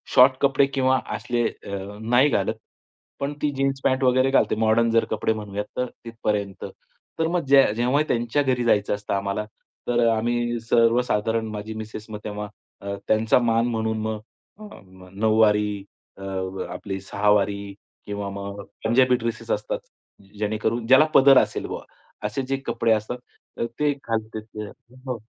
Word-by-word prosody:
Short 130 +1 +8
कपडे 140 0 +4
किंवा 130 -1 +2 0.2
असले 120 -1 -1
अ, 100 +1 -7
नाही 125 +5 +4
घालंत. - - 0 0.6
पण 140 +1 -2
ती 150 - +1
जीन्स 135 0 0
पॅन्ट 130 0 +2
वगैरे 130 +1 +3
घालते, 135 - +3
मॉडर्न 110 +1 +3
जर 115 0 +3
कपडे 110 +1 +1
म्हणूयात 105 -1 -5
तर 125 - +1 0.2
तिथपर्यंत. 105 -4 -3 0.5
तर 160 - +2
मग 170 -2 -1
जे 135 0 +7
जेव्हा 125 +5 +2
त्यांच्या 120 +4 +1
घरी 130 -2 +1
जायचं 105 -3 +2
असतं 105 0 -5
आम्हाला, 100 +1 -1 0.4
तर 120 0 +1
अ, - - +5
आम्ही 120 +1 -1
सर्वसाधारण 115 -1 +2
माझी 105 +1 -5
मिसेस 110 0 -7 0.2
तेव्हा 105 0 -4 0.3
अ, 100 0 -4
त्यांचा 110 +2 +3
मान 115 -1 +2
म्हणून 110 -2 -1
मग 110 -1 -3 0.4
अ, 210 -1 -11 0.3
नऊवारी, 105 -1 +2 0.3
अ, - - -13
व 95 -1 -4
आपली 95 +1 -5
सहावारी 100 0 +1 0.3
किंवा 100 -1 -4
मग 100 0 -6 0.2
पंजाबी 125 +2 +4
ड्रेसेस 115 -1 -4
असतात. - - -1 0.6
जेणेकरून 110 +2 -1
ज्याला 130 +4 +7
पदर 135 0 +8
असेल - - -1
बुवा - - -6 0.4
असे 105 +6 -2
जे 135 - +1
कपडे 115 - 0
असतात 110 +3 -2 0.4
तर - - -1
ते 150 -1 +3
घालते 110 -5 -4
ती. 105 0 -8 0.4
हो 125 -2 -2
110 Hz, 155 wpm, -24 LUFS, 105-125 Hz, 0.6 s, Short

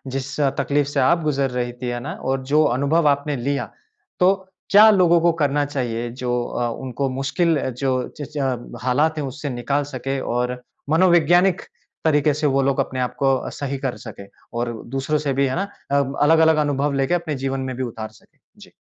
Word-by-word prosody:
जिस 135 +1 -4
अ, 140 -2 +3
तकलीफ़ 140 +1 +1
से 145 - -1
आप 165 +6 +3
गुजर 140 -3 0
रही 125 -1 -2
थीं। 125 - -2
है 120 - -3
ना, 135 - -5
और 135 0 -3
जो 155 +1 +6
अनुभव 145 +4 +2
आपने 140 +1 0
लिया, 140 +3 -2 0.5
तो 185 +1 +5 0.4
क्या 210 +2 +8
लोगों 175 -4 +4
को 170 +1 +4
करना 145 0 +2
चाहिए 120 -4 -3
जो 125 -1 -1
अ, 120 0 -2
उनको 135 +1 -2
मुश्किल 145 +5 0 0.2
जो 135 0 0 0.3
जिस 145 0 -8
ज 125 -3 -3
हालात 150 +5 +1
है 150 - -2
उससे 145 +2 -5
निकाल 135 +3 -1
सके, 135 +2 -3
और 125 0 -2 0.3
मनोवैज्ञानिक 175 +2 +4 0.4
तरीके 150 -1 +3
से 150 +1 0
वो 135 0 +2
लोग 135 0 +1
अपने 130 - -2
आपको 135 +2 +1
अ, - - -5
सही 140 -1 -4
कर 135 -2 -3
सके। 105 -4 -10 0.3
और 120 0 -1 0.2
दूसरों 140 +3 0
से 135 - +1
भी, 140 +1 +2
है 130 - -2
ना, 190 - 0 0.3
अ, 140 0 +3 0.2
अलग-अलग 160 +1 +5
अनुभव 145 0 0
लेके 135 +3 0
अपने 170 -4 -1
जीवन 135 0 -1
में 130 - -5
भी 130 - -2
उतार 110 -3 -5
सके? 110 - -24 0.2
जी। - - -15
140 Hz, 195 wpm, -21 LUFS, 130-150 Hz, 0.5 s, क्या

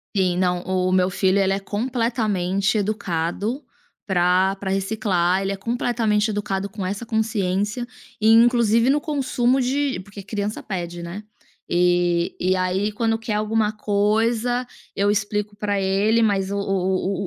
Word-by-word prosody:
Sim, 185 -2 +1
não, 180 -1 +1
o 185 0 0
meu 185 0 +3
filho 190 +1 +1
ele 195 0 +2
é 195 - -1
completamente 215 -3 -1
educado 205 - -2 0.4
para 185 0 +2
para 195 0 -5
reciclar, 195 -2 +1
ele 195 0 -1
é 195 - -3
completamente 225 -1 0
educado 200 -1 -2
com 195 -2 -5
essa 200 +5 -4
consciência, 215 0 -1 0.4
e, 215 - +4
inclusive, 230 0 +4
no 290 +2 +2
consumo 265 -4 +1
de 270 -2 0
porque 200 +1 -10
criança 205 +1 -4
pede, 175 -3 -5
né, 175 +5 -7 0.5
e 175 -1 +2
e 185 +1 +2
aí 185 +3 0
quando 225 +1 0
quer 225 -1 -3
alguma 215 0 0
coisa, 225 +4 +1 0.3
eu 200 +1 +2
explico 205 0 -2
para 205 -1 -1
ele, 200 +4 +2
mas 195 -3 +1
o - - -1
o 195 0 -1
205 Hz, 145 wpm, -22 LUFS, 190-225 Hz, 0.5 s, e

